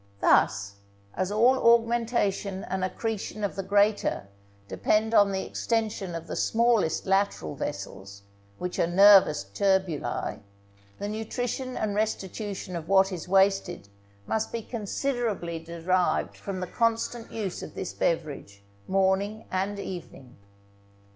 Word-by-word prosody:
Thus, 100 Hz, -1 st, +2 dB, 0.4 s
as 185 Hz, +1 st, -2 dB
all 240 Hz, +5 st, +4 dB, 0.2 s
augmentation 230 Hz, -4 st, -1 dB
and 190 Hz, 0 st, -3 dB
accretion 215 Hz, +2 st, -3 dB
of 205 Hz, -, -1 dB
the 195 Hz, -, -2 dB
greater 200 Hz, -, +1 dB, 0.4 s
depend 215 Hz, -, +1 dB
on 205 Hz, -2 st, +5 dB
the 190 Hz, 0 st, -2 dB
extension 215 Hz, -6 st, -2 dB
of 165 Hz, 0 st, -6 dB
the 155 Hz, -, -5 dB
smallest 230 Hz, -8 st, +2 dB
lateral 195 Hz, -, 0 dB
vessels, 100 Hz, +1 st, -6 dB, 0.3 s
which 180 Hz, 0 st, -4 dB
are -, -, +3 dB
nervous 190 Hz, -, +6 dB
tubuli, 190 Hz, -, -1 dB, 0.6 s
the 205 Hz, -, -4 dB
nutrition 245 Hz, +4 st, -3 dB
and 215 Hz, -2 st, -1 dB
restitution 205 Hz, -2 st, -3 dB
of 165 Hz, 0 st, -6 dB
what 195 Hz, 0 st, +4 dB
is 180 Hz, -2 st, -6 dB
wasted 190 Hz, -, +2 dB, 0.4 s
must 220 Hz, -, -1 dB
be 230 Hz, -1 st, -4 dB
considerably 220 Hz, -6 st, -2 dB
derived 170 Hz, +2 st, 0 dB
from 190 Hz, -2 st, -6 dB
the -, -, -1 dB
constant 230 Hz, +3 st, -1 dB
use 205 Hz, -5 st, -4 dB
of -, -, -9 dB
this 185 Hz, -, -5 dB
beverage 145 Hz, -12 st, -2 dB, 0.2 s
morning 195 Hz, +3 st, +1 dB
and 195 Hz, +2 st, -1 dB
evening. 170 Hz, -10 st, -8 dB
195 Hz, 125 wpm, -27 LUFS, 175-220 Hz, 0.6 s, nervous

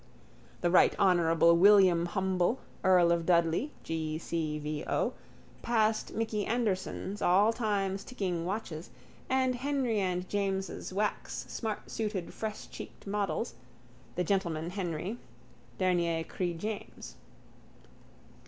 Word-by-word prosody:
The 175 Hz, -, +2 dB
Right 180 Hz, -, +5 dB
Honourable 170 Hz, -3 st, +4 dB
William 185 Hz, -2 st, +6 dB
Humble, 190 Hz, +4 st, +1 dB, 0.3 s
earl 180 Hz, -2 st, +5 dB
of 170 Hz, -1 st, +2 dB
Dudley, 170 Hz, -, +3 dB
G. 160 Hz, -1 st, -2 dB
C. 160 Hz, -2 st, -2 dB
V. 150 Hz, 0 st, -4 dB
O., -, -, 0 dB, 0.5 s
passed 220 Hz, -2 st, +1 dB
Micky 220 Hz, -2 st, -1 dB
Anderson's 205 Hz, -3 st, -2 dB
all 200 Hz, +5 st, +4 dB
times 200 Hz, -4 st, -1 dB
ticking 185 Hz, -9 st, -3 dB
watches 175 Hz, -4 st, -4 dB, 0.4 s
and 260 Hz, -1 st, +2 dB
Henry 255 Hz, -3 st, 0 dB
and 180 Hz, -1 st, -1 dB
James's 195 Hz, -2 st, -2 dB
wax 210 Hz, +3 st, -2 dB
smartsuited 215 Hz, -3 st, -4 dB
freshcheeked 215 Hz, -1 st, -7 dB
models, 205 Hz, +3 st, -1 dB, 0.6 s
the 180 Hz, -, +1 dB
gentleman 170 Hz, -3 st, -1 dB
Henry, 185 Hz, +3 st, -3 dB, 0.6 s
dernier 170 Hz, -3 st, +1 dB
cri 175 Hz, +1 st, -3 dB
James. 215 Hz, +5 st, -6 dB
190 Hz, 105 wpm, -31 LUFS, 170-215 Hz, 0.6 s, William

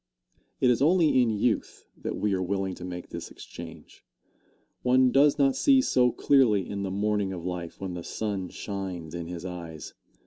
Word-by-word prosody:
It 125 Hz, -, +4 dB
is 120 Hz, -, +1 dB
only 155 Hz, -3 st, +4 dB
in 120 Hz, -, +2 dB
youth 110 Hz, +2 st, -1 dB
that -, -, -5 dB
we 105 Hz, -1 st, 0 dB
are 95 Hz, -, 0 dB
willing 95 Hz, 0 st, -1 dB
to 90 Hz, -, -10 dB
make 90 Hz, -1 st, -6 dB
this -, -, -7 dB
exchange. 85 Hz, -1 st, -11 dB, 0.8 s
One 130 Hz, 0 st, +4 dB
does 140 Hz, +2 st, +5 dB
not 135 Hz, -2 st, +3 dB
see 275 Hz, -2 st, +5 dB
so 125 Hz, -, +3 dB
clearly 115 Hz, -10 st, +3 dB
in 100 Hz, -1 st, -4 dB
the 100 Hz, -, -2 dB
morning 100 Hz, 0 st, 0 dB
of 90 Hz, -2 st, -6 dB
life 90 Hz, -2 st, -5 dB
when 95 Hz, -2 st, -4 dB
the 85 Hz, -1 st, -6 dB
sun 100 Hz, -3 st, -3 dB
shines 95 Hz, -5 st, -6 dB
in 85 Hz, -1 st, -5 dB
his 90 Hz, 0 st, -6 dB
eyes. 85 Hz, -5 st, -7 dB
100 Hz, 180 wpm, -27 LUFS, 90-125 Hz, 0.8 s, does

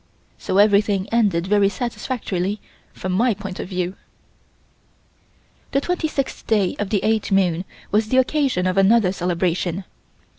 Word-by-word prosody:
So 185 Hz, -, -1 dB
everything 205 Hz, -1 st, +3 dB
ended 205 Hz, -7 st, +2 dB
very 200 Hz, 0 st, +3 dB
satisfactorily 210 Hz, -4 st, -3 dB, 0.3 s
from 185 Hz, -, -5 dB
my 225 Hz, +4 st, +2 dB
point 195 Hz, -2 st, -7 dB
of -, -, -5 dB
view. 180 Hz, 0 st, -2 dB, 1.8 s
The 275 Hz, -, +2 dB
twenty 355 Hz, 0 st, -1 dB
sixth 275 Hz, -3 st, -4 dB
day 205 Hz, -5 st, +2 dB
of 205 Hz, -1 st, -2 dB
the 200 Hz, -2 st, 0 dB
eighth 220 Hz, -1 st, 0 dB
moon 185 Hz, -2 st, +2 dB, 0.3 s
was 215 Hz, +1 st, +1 dB
the 260 Hz, -, +2 dB
occasion 260 Hz, -7 st, +1 dB
of 185 Hz, +1 st, 0 dB
another 200 Hz, -1 st, +4 dB
celebration. 180 Hz, 0 st, -1 dB
200 Hz, 140 wpm, -21 LUFS, 185-225 Hz, 1.8 s, another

